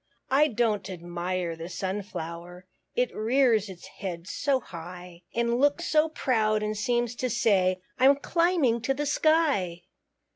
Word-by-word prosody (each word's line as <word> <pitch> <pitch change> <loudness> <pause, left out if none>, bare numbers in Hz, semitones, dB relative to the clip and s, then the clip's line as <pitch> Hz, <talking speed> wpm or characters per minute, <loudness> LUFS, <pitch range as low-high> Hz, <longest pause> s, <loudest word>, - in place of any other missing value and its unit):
I 290 +3 +5
don't 220 -6 0
admire 175 0 -3
the 165 +1 -7
Sunflower, 180 -2 -5 0.3
It 250 -1 0
rears 225 -2 +2
its 185 -2 -10
head 175 -3 -7
so 275 +3 0
high; 175 -3 -10
And 235 +1 +1
looks 290 +5 +2
so 310 0 +3
proud, 215 -8 +1
and 215 0 -2
seems 240 +2 0
to 255 - -1
say, 190 -5 +2 0.2
"I'm 270 +2 +6
climbing 315 -5 +1
to 270 +4 0
the 295 +2 -2
sky." 285 - +2
215 Hz, 140 wpm, -27 LUFS, 180-265 Hz, 0.3 s, I'm